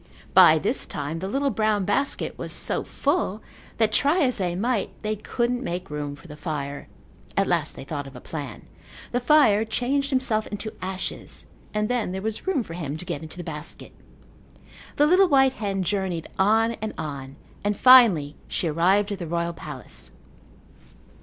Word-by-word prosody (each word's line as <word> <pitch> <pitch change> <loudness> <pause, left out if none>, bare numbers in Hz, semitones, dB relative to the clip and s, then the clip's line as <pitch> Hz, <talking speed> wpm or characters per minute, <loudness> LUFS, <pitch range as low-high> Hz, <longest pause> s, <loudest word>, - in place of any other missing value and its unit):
By - - +8
this - - -1
time 150 +3 -4
the 190 - -4
little 275 +6 0
brown 215 -2 +1
basket 270 +8 0
was - - -5
so - - +3
full, 220 -7 -1 0.3
that, 220 -1 +2
try 290 - +3
as 255 -6 +2
they 175 -2 -1
might, 225 +2 0
they 215 0 -1
couldn't 240 +4 -2
make 180 -3 -4
room 145 -1 -4
for 145 - -16
the 150 - -9
fire. 145 -3 -5 0.5
At - - +4
last - - 0
they - - -8
thought 145 0 -5
of 135 - -12
a - - -8
plan. 140 -5 -7 0.5
The 245 - +1
fire 245 -5 +5
changed 265 +5 -1
himself 255 -5 +1
into 215 +1 -5
ashes 190 +1 -5 0.3
and 210 0 0
then 235 -6 -1
there 190 - -4
was 220 - -4
room 345 -10 +1
for 165 - -9
him 155 -4 -4
to 180 - -8
get 175 -5 -4
into 160 +2 -10
the 175 - -5
basket. 150 -2 -8 1.0
The 295 - +4
little 365 +5 +5
white 270 -4 +4
hen 200 -5 -2
journeyed 185 -3 -2
on 220 +4 +4
and 220 0 -4
on, 140 -3 -6 0.3
and 205 0 0
finally 215 - +7
she 175 - -2
arrived 190 +6 +2
at 200 - -4
the 170 - -5
royal 170 +1 -1
palace. 150 -6 -7
200 Hz, 180 wpm, -25 LUFS, 165-240 Hz, 1.0 s, By